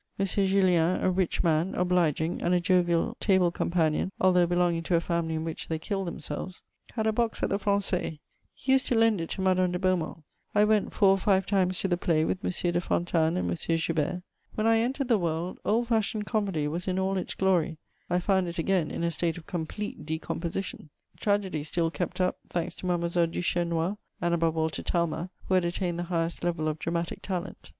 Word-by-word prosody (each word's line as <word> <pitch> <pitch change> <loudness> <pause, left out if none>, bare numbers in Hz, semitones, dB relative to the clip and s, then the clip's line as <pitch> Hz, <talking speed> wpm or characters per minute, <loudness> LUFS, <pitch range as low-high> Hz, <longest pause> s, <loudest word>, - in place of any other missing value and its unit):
M. 195 - +1
Jullien, 185 -3 +2
a 185 - +3
rich 185 -1 0
man, 165 +2 +1
obliging, 175 -3 +1
and 175 +1 +2
a - - +3
jovial 175 +4 +2
table 190 -4 +3
companion, 170 0 0
although 180 -2 +4
belonging 175 -1 +1
to 170 +1 0
a - - +4
family 170 -1 -1
in 160 - -2
which 165 -1 -5
they 160 - -1
killed 195 +3 -3
themselves, 170 +2 -6 0.3
had 220 -2 -1
a 220 - +2
box 230 0 -1
at - - 0
the 200 - +1
Français; 200 -5 0 0.3
he 265 - -3
used 265 0 +3
to 245 - +1
lend 225 -4 +3
it 165 - -4
to 190 - -3
Madame 185 -1 +2
de 180 - -1
Beaumont: 180 -4 -1 0.3
I 210 0 +6
went 215 -1 +2
four 200 - +4
or 195 0 +4
five 190 -1 +2
times 185 -2 +1
to - - 0
the 175 -2 +1
play 160 -3 +1
with 185 - -2
M. - - 0 0.2
de 175 - +1
Fontanes 170 -1 +1
and - - -1
M. 165 -1 0
Joubert. 165 +2 -1 0.3
When 215 - 0
I 225 0 +5
entered 260 +3 -1
the 230 -4 +3
world, 170 +1 -2
old 235 +2 +1
fashioned 220 -1 0
comedy 195 -10 0
was 170 +5 -4
in 185 0 0
all 190 +1 0
its 185 - -3
glory; 175 -4 +1 0.3
I 175 - +2
found 190 0 +1
it 170 - -5
again 170 -1 +1
in - - -4
a 170 - +1
state 165 +1 -1
of 165 - -10
complete 205 +3 -5
decomposition. 160 +2 -4 0.3
Tragedy 195 -7 0
still 165 +1 0
kept 175 +2 -4
up, 180 0 +1
thanks 175 0 -2
to 185 - -5
Mademoiselle 170 -1 +1
Duchesnois 175 +2 -1 0.2
and, 175 -1 0
above 165 -1 +1
all, 160 0 +1
to - - -5
Talma, 170 0 -1 0.2
who - - 0
had 185 -1 +4
attained 175 0 -2
the - - -1
highest 170 -1 -1
level 170 -3 0
of 155 0 -2
dramatic 170 0 -3
talent. 185 -1 -5
180 Hz, 210 wpm, -28 LUFS, 165-195 Hz, 0.3 s, I